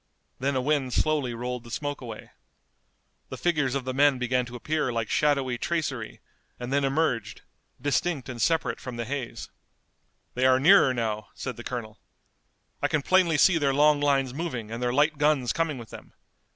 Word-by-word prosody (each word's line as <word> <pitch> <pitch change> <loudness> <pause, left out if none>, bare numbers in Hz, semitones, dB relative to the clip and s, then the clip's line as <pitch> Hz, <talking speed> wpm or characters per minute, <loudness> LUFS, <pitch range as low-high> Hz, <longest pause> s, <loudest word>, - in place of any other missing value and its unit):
Then 135 +1 0
a 130 - +1
wind 135 -2 0
slowly 145 -6 0
rolled 125 +1 -4
the 120 - -12
smoke 145 +4 -4
away. 115 -4 -9 1.0
The - - -6
figures 150 -7 0
of 135 -2 -2
the 130 - -2
men 140 0 +4
began 125 0 0
to 120 - -9
appear 150 +2 -1
like 115 -2 -2
shadowy 140 -5 +1
tracery, 145 -9 -3 0.4
and 125 +2 -4
then 140 0 +2
emerged, 135 -5 -1 0.4
distinct 145 -1 -1
and 125 -3 -6
separate 165 +7 +1
from 125 -3 -7
the 120 0 -4
haze. 125 -3 -5 0.8
"They 130 +1 +2
are 130 0 +4
nearer 175 -1 +6
now," 110 -4 -2
said 125 -3 -5
the 120 - -9
Colonel. 115 -3 -6 0.8
"I - - +2
can 155 -3 -1
plainly 180 -3 +3
see 175 +1 +5
their 140 -2 +1
long 150 0 +4
lines 135 -3 +1
moving 130 -8 -4
and 115 +1 -5
their 125 0 0
light 150 +3 +2
guns 145 -5 +2
coming 165 -3 -1
with 115 -2 -10
them. - - -12
135 Hz, 180 wpm, -26 LUFS, 120-150 Hz, 1.0 s, nearer